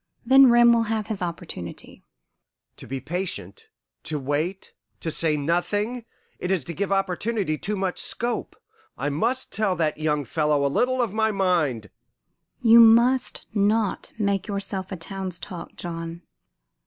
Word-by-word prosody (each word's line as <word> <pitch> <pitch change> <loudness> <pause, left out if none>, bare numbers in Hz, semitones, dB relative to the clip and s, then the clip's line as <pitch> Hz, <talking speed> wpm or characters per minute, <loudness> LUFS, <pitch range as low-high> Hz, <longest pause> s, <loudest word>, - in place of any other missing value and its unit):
Then 265 +1 +7
Rem 240 0 +6
will 230 -1 +2
have 220 -1 -1
his 215 -3 -5
opportunity." 170 - -6 0.7
"To - - -11
be 135 0 -4
patient 150 - -5 0.3
to 155 - -3
wait 150 +7 -3 0.3
to 160 - -3
say 155 -1 +3
nothing 205 - -1 0.3
it 180 - -3
is 190 -6 +1
to 170 - -6
give 200 +4 -3
opportunity 195 -1 0
too 210 +7 -4
much 190 -2 -2
scope. 240 +1 -2 0.4
I - - -1
must 235 - 0
tell 200 -3 +1
that 155 -3 -1
young 150 -2 0
fellow 150 +1 +1
a 140 - 0
little 255 0 +2
of 215 -5 -3
my 220 0 +2
mind 170 - 0 0.3
" - - -49
"You 235 - +10
must 235 +3 +5
not 210 0 +1
make 200 -2 0
yourself 200 -2 -4
a - - -3
town's 185 +1 -4
talk, 180 -2 -8
John. 165 0 -6
190 Hz, 155 wpm, -24 LUFS, 160-220 Hz, 0.7 s, You